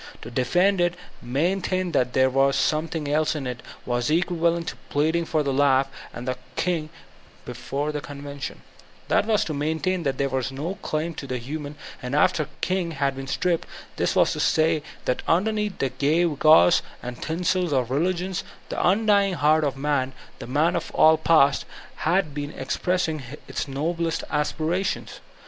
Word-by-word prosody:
To 115 Hz, -, -8 dB
defend 175 Hz, +10 st, +2 dB
it, 175 Hz, 0 st, +2 dB
to 175 Hz, -, -17 dB, 0.3 s
maintain 180 Hz, +6 st, 0 dB
that 125 Hz, -5 st, +1 dB
there 130 Hz, 0 st, +4 dB
was 135 Hz, +1 st, +3 dB
some 155 Hz, +3 st, +1 dB
thing 160 Hz, -3 st, -4 dB
else 155 Hz, +2 st, +1 dB
in 145 Hz, -3 st, -4 dB
it, 125 Hz, -2 st, -4 dB, 0.3 s
was 120 Hz, +1 st, 0 dB
equivalent 170 Hz, 0 st, +1 dB
to -, -, -8 dB
pleading 160 Hz, +3 st, +1 dB
for 155 Hz, -1 st, 0 dB
the 140 Hz, -1 st, -1 dB
life 135 Hz, -1 st, +4 dB, 0.3 s
of 120 Hz, -, -7 dB
the 130 Hz, 0 st, -2 dB, 0.2 s
King 165 Hz, -4 st, -1 dB, 0.6 s
before 145 Hz, +2 st, -3 dB
the 150 Hz, -1 st, -4 dB
convention 140 Hz, 0 st, -7 dB
I -, -, -24 dB, 0.3 s
That -, -, +3 dB
was 215 Hz, -2 st, +2 dB
to 155 Hz, -, -3 dB
main 155 Hz, +2 st, -1 dB
tain 185 Hz, +4 st, 0 dB
that 135 Hz, -4 st, -1 dB
there 140 Hz, -, +1 dB
were 130 Hz, 0 st, 0 dB, 0.4 s
claims 155 Hz, +1 st, -3 dB
of 140 Hz, -, -9 dB
the 130 Hz, -, -1 dB
human 145 Hz, +4 st, -6 dB, 0.2 s
— -, -, -22 dB
after 145 Hz, +4 st, +2 dB
the -, -, -21 dB
King 180 Hz, -2 st, 0 dB
had 140 Hz, -2 st, 0 dB
been 135 Hz, 0 st, -6 dB
stripped; 170 Hz, +4 st, 0 dB, 0.3 s
this -, -, 0 dB
was -, -, +4 dB
to -, -, -5 dB
say 160 Hz, 0 st, +2 dB, 0.2 s
that 125 Hz, -, 0 dB
underneath 210 Hz, +3 st, +1 dB
the 135 Hz, -, 0 dB
gewgaws 155 Hz, +2 st, +4 dB, 0.2 s
and 125 Hz, 0 st, -7 dB
tinsel 180 Hz, +1 st, 0 dB
of 125 Hz, -2 st, 0 dB
religions 180 Hz, +5 st, 0 dB, 0.3 s
the -, -, -2 dB
undying 200 Hz, 0 st, +3 dB
heart 155 Hz, 0 st, +3 dB
of 140 Hz, -2 st, -1 dB
man, 135 Hz, -2 st, 0 dB, 0.3 s
the -, -, -7 dB
man 150 Hz, +7 st, +2 dB
of 165 Hz, -, -2 dB
all 160 Hz, 0 st, +6 dB
the -, -, -21 dB
past, 150 Hz, -4 st, +4 dB, 0.3 s
had 170 Hz, -2 st, +1 dB
been 145 Hz, 0 st, -4 dB
expressing 165 Hz, -1 st, -1 dB, 0.3 s
its -, -, -3 dB
noblest 165 Hz, +4 st, -2 dB
aspirations. 165 Hz, +5 st, -1 dB
155 Hz, 175 wpm, -24 LUFS, 140-175 Hz, 0.6 s, all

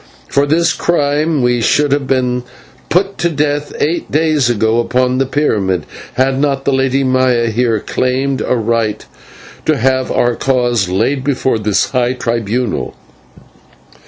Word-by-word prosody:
For 140 Hz, +1 st, +1 dB
this 165 Hz, +3 st, +2 dB
crime 150 Hz, -2 st, 0 dB
we 120 Hz, -1 st, +1 dB
should 145 Hz, +5 st, +2 dB
have 140 Hz, -1 st, 0 dB
been 125 Hz, -2 st, 0 dB, 0.5 s
put 195 Hz, +3 st, 0 dB
to 170 Hz, -, +1 dB
death 145 Hz, -1 st, -1 dB
eight 165 Hz, +4 st, -1 dB
days 155 Hz, -4 st, +2 dB
ago 110 Hz, 0 st, +1 dB
upon 125 Hz, +2 st, +1 dB
the 135 Hz, -, +1 dB
pyramid, 100 Hz, -, 0 dB, 0.3 s
had 130 Hz, +1 st, +1 dB
not 140 Hz, -2 st, 0 dB
the 140 Hz, -, +2 dB
Lady 135 Hz, +1 st, +1 dB
Maya 130 Hz, -3 st, +2 dB
here 115 Hz, -1 st, +1 dB
claimed 130 Hz, +4 st, -1 dB
a -, -, 0 dB
right 115 Hz, -2 st, -1 dB, 0.6 s
to 155 Hz, -2 st, +3 dB
have 130 Hz, +1 st, +1 dB
our 120 Hz, 0 st, +2 dB
cause 120 Hz, -7 st, 0 dB
laid 120 Hz, +9 st, 0 dB
before 130 Hz, -4 st, 0 dB
this 105 Hz, -1 st, 0 dB
high 125 Hz, -1 st, +1 dB
tribunal. 120 Hz, -1 st, -2 dB
130 Hz, 145 wpm, -15 LUFS, 120-145 Hz, 0.6 s, to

